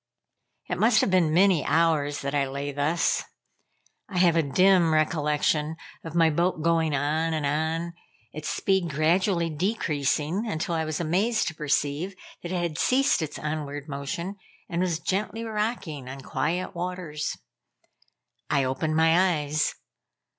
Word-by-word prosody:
It - - -3
must 220 0 +5
have - - +1
been 175 -4 +3
many 180 -2 +4
hours 155 -2 +1
that 140 0 -3
I 140 -2 +1
lay 140 +2 -4
thus. 145 +4 +1 0.9
I 190 - -5
have 175 -2 +4
a 165 - +4
dim 180 +3 +4
recollection 150 0 +1 0.3
of 165 0 -7
my 165 -2 +4
boat 170 0 0
going 165 -2 +2
on 155 +3 0
and 155 -2 -1
on, 160 +4 -1 0.4
its 155 0 -5
speed 190 -3 +1
gradually 170 +3 +1
decreasing, 160 - -1
until 165 -1 -2
I 160 -1 0
was 155 -1 -3
amazed 190 +8 +1
to - - -9
perceive 150 +4 -1 0.3
that 175 - -6
it 185 - -1
had 170 -3 -2
ceased 270 -5 +3
its 155 -2 -4
onward 150 -1 -4
motion 155 +7 -4 0.3
and 175 -1 -2
was 180 -3 0
gently 210 +6 -2
rocking 210 - -3
on 135 +1 -7
quiet 160 +7 -2
waters. 175 -4 -4 1.1
I 140 -2 +2
opened 135 +4 -1
my 165 0 +3
eyes. 150 +1 0
160 Hz, 145 wpm, -26 LUFS, 150-180 Hz, 1.1 s, must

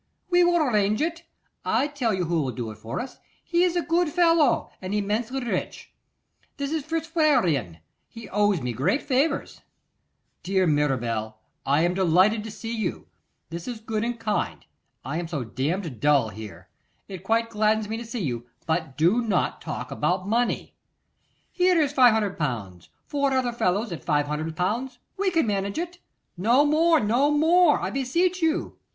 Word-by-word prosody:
'We 355 0 +5
will 345 0 +3
arrange 215 -9 +2
it: 335 +2 -2 0.4
I - - +1
tell 285 -6 -1
you 185 -3 -1
who 165 -1 0
will 135 -3 -2
do 115 -1 -5
it 110 - -13
for 110 +2 -5
us. 260 - -7 0.2
He 345 0 +1
is 360 -1 +1
a 350 - +1
good 340 0 +1
fellow, 330 -5 +3
and 190 +2 -3
immensely 220 +6 -1
rich: 240 - -4 0.6
it 280 0 -3
is 315 -2 -1
Fitzwarrene; 275 - +1 0.3
he 230 -1 -11
owes 205 -4 +2
me 125 -1 -2
great 180 - 0
favours.' 280 +3 0 0.8
'Dear 190 0 +1
Mirabel, 120 -8 0 0.3
I 145 +4 +3
am 175 +1 +2
delighted 190 +4 +3
to - - -5
see 225 +2 -6
you. 215 -5 -4 0.4
This 170 0 -6
is 240 -3 -5
good 220 -1 -3
and 235 0 -3
kind. 215 -2 -2 0.4
I 145 +5 -2
am 175 - -4
so 155 -6 -3
damned 140 - -3
dull 140 -5 +3
here. 100 -3 -10 0.4
It 190 -4 -8
quite 230 +1 +1
gladdens 215 0 +1
me 220 - -3
to 235 - -6
see 230 -2 -5
you; 120 -4 -3 0.2
but 160 -4 -2
do 180 +10 +3
not 210 -6 -1
talk 125 -6 -6
about 180 +5 -1
money.' 235 +3 0 0.8
'Here 360 -1 +3
is 290 -3 +1
500L.; 155 - +1 0.2
four 280 -2 0
other 255 -2 +1
fellows 205 -1 0
at 170 - -6
500L. 165 - -1 0.2
we 395 0 +1
can 330 -6 +2
manage 200 -2 -2
it.' 350 +1 -4 0.4
'No 235 +10 +4
more, 320 +2 +4
no 240 +7 +2
more! 320 +2 +4
I - - -3
beseech 340 +8 0
you. 325 +1 -1
215 Hz, 165 wpm, -25 LUFS, -, 0.8 s, We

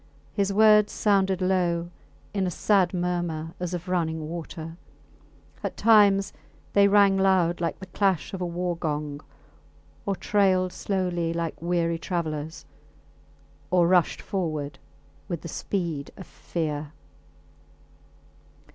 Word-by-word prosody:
His 200 -1 0
words 210 0 +5
sounded 195 -3 +2
low, 175 -2 +1 0.4
in 195 -2 0
a - - 0
sad 185 +1 +2
murmur 175 -3 -2
as 180 0 -3
of 175 +1 -7
running 160 -3 -1
water; 165 0 -7 0.9
at - - -4
times 205 -3 +5 0.4
they 200 0 +6
rang 200 -1 +5
loud 180 -3 +2
like 170 - -1
the 190 - -8
clash 190 -3 0
of 190 - -5
a - - 0
war 175 0 -2
gong 150 -3 -3 0.9
or 200 - +1
trailed 185 -3 +2
slowly 180 -4 -1
like 165 -2 -3
weary 170 -1 0
travellers 160 -3 -4 1.0
or 175 -1 +4
rushed 180 -1 +2
forward 155 -7 -3 0.5
with 175 -4 -4
the - - -7
speed 165 -4 -3
of 190 - -9
fear. 150 -3 -4
175 Hz, 120 wpm, -26 LUFS, 165-195 Hz, 1.0 s, they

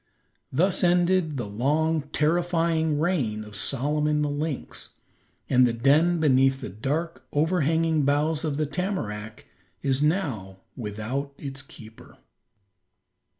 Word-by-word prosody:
Thus 175 +8 +2
ended 175 -3 +2
the 120 - -3
long, 150 +9 +1
terrifying 165 -1 +1
reign 135 -11 0
of 105 -1 -11
Solomon 150 +7 0
the 145 - -1
lynx, 145 -1 -5 0.5
and 125 -1 +5
the 120 - 0
den 150 +8 +3
beneath 135 -3 +3
the - - -6
dark, 135 - -3
overhanging 160 0 +2
boughs 150 +3 +1
of 150 -3 -1
the 155 - +1
tamarack 140 - -4 0.4
is 135 0 +1
now 135 - -1 0.2
without 120 +6 -4
its 135 -1 -6
keeper. 110 -4 -14
150 Hz, 115 wpm, -26 LUFS, 130-160 Hz, 0.5 s, and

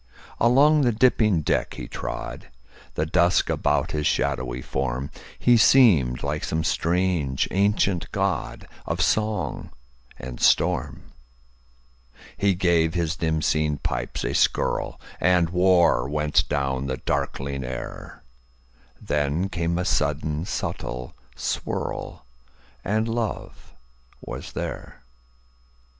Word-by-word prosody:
Along 145 +6 +5
the 125 -3 +3
dipping 110 -6 +3
deck - - 0
he - - -7
trod, - - -6 0.5
The 75 - 0
dusk 85 +2 +2
about - - 0
his 75 -1 0
shadowy 60 0 -1
form; 65 0 -3 0.3
He 120 -1 +4
seemed 100 - +5
like 75 +2 -2
some 80 0 -1
strange 85 -6 0
ancient 100 -2 +1
godOf - - -3
song 105 -6 0 0.5
and 60 -1 -8
storm. - - +1 1.2
He 100 -2 +2
gave 85 -2 +2
his 85 -1 0
dim 80 -1 -1
seen 75 -1 +1
pipes - - -3
a - - -1
skirlAnd 90 -1 0
war 90 -7 +3
went 75 0 +1
down 70 -1 -1
the 65 -1 -2
darkling 70 +1 -3
air; 65 0 -7 0.8
Then 75 +6 -1
came 85 -2 -1
a 90 - -1
sudden 80 +2 0
subtle 60 -8 -4 0.2
swirl, - - -4 0.6
And 110 +4 0
love 115 -1 -4 0.4
was - - -8
there. - - -6
80 Hz, 105 wpm, -24 LUFS, 70-95 Hz, 1.2 s, Along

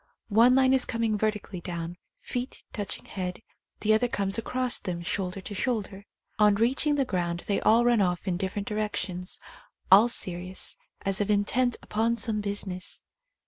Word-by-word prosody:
One 230 +4 +6
line 265 0 +4
is 260 -1 +4
coming 230 -2 0
vertically 210 -4 -2
down, 170 -1 -5 0.3
feet 250 +1 -5
touching 205 -3 -4
head, 185 +2 -5 0.4
the 215 0 +3
other 220 +3 +3
comes 200 -2 -1
across 250 +2 +1
them 170 -2 -4
shoulder 185 +1 -2
to 205 - -7
shoulder. 205 -3 -2 0.3
On 210 -1 +5
reaching 260 +7 +2
the 275 -2 +1
ground 175 -5 -2
they 200 - 0
all 230 +2 +4
run 240 -3 +4
off 180 0 0
in 180 - +1
different 195 +2 -3
direc 210 0 -2
tions, 180 -1 -4 0.5
all 210 +5 +8
serious, 185 -3 0 0.3
as 195 +1 +2
if 205 - -1
intent 230 +4 +2
upon 225 +2 0
some 220 -2 +1
busi 205 0 -2
ness. 185 -1 -4
205 Hz, 170 wpm, -27 LUFS, 185-230 Hz, 0.5 s, all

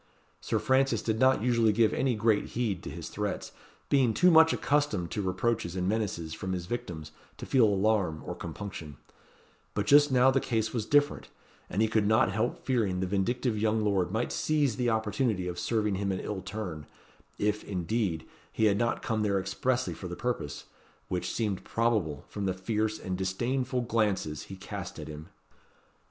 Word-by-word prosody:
Sir - - -1
Francis 130 -4 +2
did 110 -1 -1
not 130 -4 +4
usually 115 -3 +3
give 110 0 +3
any 130 -3 +1
great 110 -1 +2
heed 110 -7 0
to - - -7
his - - -7
threats, - - -3 0.4
being 130 -5 +3
too 180 0 +5
much 160 0 +7
accustomed 140 - 0
to 105 - -2
reproaches 95 -1 -1
and 90 -1 -1
menaces 95 -7 -2
from 95 +3 -4
his 90 -1 -3
victims 85 -8 -5 0.3
to - - -7
feel 130 -4 +4
alarm 100 -5 +1
or - - -4
compunction; 80 -8 -7 0.8
but 105 - 0
just 145 +4 +6
now 130 +1 +5
the 135 - +2
case 110 -4 -1
was 110 -3 -2
different, 145 0 +2 0.4
and 105 - +1
he - - +3
could 110 -2 +1
not 110 +4 +4
help 110 +3 -2
fearing 110 -8 +1
the 95 - 0
vindictive 110 +6 0
young 110 0 +1
lord 95 -4 +1
might 110 +4 -1
seize 145 -6 +1
the 125 -2 +1
opportunity 110 -3 0
of 90 0 -4
serving 105 -3 0
him 100 +1 -1
an 95 - -2
ill 100 -3 -4
turn, 90 -6 -6 0.5
if, 105 +1 0
indeed, 90 -2 -2 0.3
he 110 - +1
had 100 -1 +3
not 120 0 0
come 110 -1 0
there 100 -2 +1
expressly 130 +6 -1
for 95 - -7
the 90 - -5
purpose, 120 -13 -3 0.4
which 90 -1 -2
seemed 105 -5 -2
probable, 110 - 0
from 100 -2 -4
the 95 - 0
fierce 110 +3 -1
and 95 -3 -4
disdainful 125 +7 -1
glances 105 - -1
he 95 - -8
cast 95 - -7
at - - -7
him. 75 +1 -8
110 Hz, 180 wpm, -29 LUFS, 95-120 Hz, 0.8 s, much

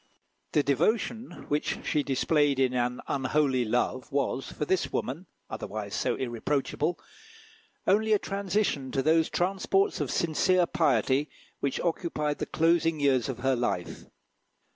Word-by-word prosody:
The 150 - +3
devotion 220 - 0
which 150 +1 -2
she 150 - +1
displayed 145 0 +1
in 130 -1 +2
an 125 0 -1
unholy 135 -1 +1
love 125 +3 -1
was, 135 -1 -1
for 150 - -3
this 190 +3 0
woman, 160 +9 -3 0.2
otherwise 105 -1 -5
so - - 0
irreproachable, 135 +7 -1 0.9
only 215 +3 +3
a - - +6
transition 195 -9 -1
to 135 - +1
those 160 +2 +3
transports 195 +2 +1
of - - -2
sincere 175 +2 +2
piety 150 -3 +1 0.3
which 140 - -1
occupied 160 -3 -1
the - - -3
closing 165 -1 +2
years 135 -2 +2
of 125 -2 -5
her 135 0 +3
life. 120 -7 -3
145 Hz, 135 wpm, -28 LUFS, 130-170 Hz, 0.9 s, a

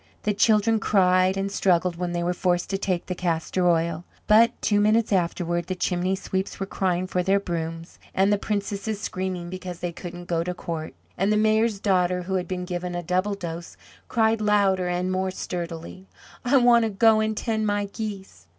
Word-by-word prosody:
The 210 - +1
children 215 +2 +3
cried 185 -2 +3
and 195 0 -2
struggled 180 -3 +2
when 175 0 -3
they 175 0 -1
were 175 +1 0
forced 175 0 0
to 195 - 0
take 185 -3 -1
the 185 - -3
castor 175 +1 0
oil; 165 0 0 0.2
but, 225 +2 +5
two 205 -1 +2
minutes 215 +1 +3
afterward, 175 -1 0
the 185 - -2
chimney 180 +1 0
sweeps 190 0 -3
were 195 - -1
crying 185 -2 -1
for 180 -1 -1
their 195 +2 +2
brooms, 165 -2 -5 0.2
and 195 +2 +3
the 205 - +1
princesses 200 0 -3
screaming 185 -3 -4
because 185 -1 -6
they 175 0 -3
couldn't 175 +1 -8
go 170 -1 0
to 180 +1 -4
court, 165 -3 -5 0.2
and 195 +3 +2
the 210 - +3
Mayor's 220 0 +2
daughter, 180 -3 +1
who 190 +2 -4
had 180 -2 -1
been 180 0 -3
given 180 0 -4
a 175 - -3
double 185 +4 0
dose, 170 -3 -7 0.3
cried 225 -1 +2
louder 200 -3 +2
and 180 +1 -1
more 185 0 0
sturdily: 175 0 -6 0.4
"I 255 +3 +4
want 240 -2 +6
to - - 0
go 215 +2 +4
and 220 0 -1
tend 220 -2 -1
my 205 0 0
geese. 200 - -7
185 Hz, 195 wpm, -25 LUFS, 175-205 Hz, 0.4 s, want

